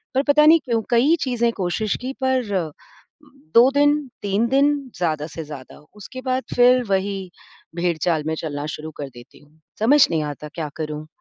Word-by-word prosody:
पर 270 - +3
पता 300 +1 +5
नहीं 325 +2 +7
क्यों 230 -2 0
कई 250 +7 +4
चीज़ें 235 -3 +1
कोशिश 195 +3 -1
की 260 +2 -4
पर, 205 - 0 0.8
2 240 +3 +8
दिन, 290 0 +2
3 200 +3 0
दिन 280 +3 +3 0.2
ज़्यादा 155 -4 -1
से 165 0 -7
ज़्यादा, 145 -4 -11 0.2
उसके 235 +5 -9
बाद 255 0 -1
फ़िर 250 +1 +5
वही 195 -1 -1 0.4
भेड़चाल 170 -2 0
में 160 - 0
चलना 145 -2 -4
शुरू 155 +1 -8
कर 140 -2 -6
देती 120 -2 -16
हूँ। 150 +2 -25 0.2
समझ 275 +6 +5
नहीं 160 -2 0
आता 150 0 -6
क्या 155 -3 -4
करूँ? 155 -1 -5
200 Hz, 170 wpm, -22 LUFS, 155-255 Hz, 0.8 s, 2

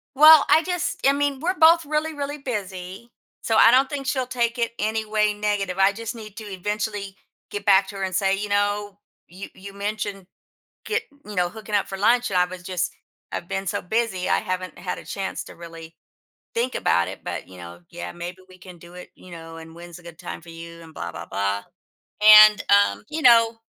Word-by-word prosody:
Well, 305 +1 +8
I 320 - +6
just 355 -1 -3
I - - +6
mean, 285 -1 -1
we're 360 +4 -1
both 330 0 +6
really, 305 +2 -1
really 290 0 -5
busy, 200 -4 -6 0.3
so 225 - -1
I 230 - +7
don't 265 +1 +4
think 280 -2 -5
she'll 260 -2 -1
take 240 -1 -1
it 235 - 0
any 220 +1 -1
way 210 0 +1
negative, 205 -3 -2
I 195 +1 +5
just 225 +2 -6
need 215 -3 -11
to 220 - -7
eventually 205 0 -4 0.3
get 205 0 -6
back 195 -1 +5
to 200 - -9
her 195 - -4
and 185 -1 -3
say, 195 +1 +1
you 205 +1 -4
know, 205 0 -1 0.3
"You 185 +3 -10
you 195 +1 -11
mentioned, 200 -2 -4 0.6
get 445 +1 -1 0.2
you 210 -1 -8
know, 180 -1 +2
hooking 215 0 -6
up 200 - +1
for 195 - -6
lunch, 240 +4 +2
and 190 - 0
I 180 - +4
was 180 0 -9
just 180 -1 -2 0.4
I've 170 - -5
been 195 0 -4
so - - -2
busy 190 -1 -1
I - - +3
haven't 185 0 -5
had 180 - -5
a - - -11
chance 195 -1 -4
to - - -12
really 165 -1 -11 0.6
think 245 +2 -1
about 85 0 +1
it, 95 - -9
but, 85 -2 -5
you 95 - -14
know, 85 0 -10
yeah, 175 - -7
maybe 175 +1 -7
we 185 - -16
can 180 -1 -13
do 170 +1 -15
it, 180 0 -11
you 185 - -16
know, 165 -1 -10
and 160 0 -11
when's 170 0 -11
a - - -19
good 170 -2 -12
time - - -7
for 170 - -15
you?" 165 0 -10
and 160 -1 -14
blah, 85 - -6
blah, 85 +1 -8
blah, 100 0 -2 0.9
and, 210 - -7
um, 200 0 +3
you 310 +1 -4
know 230 -2 +6
200 Hz, 220 wpm, -23 LUFS, 180-230 Hz, 0.9 s, Well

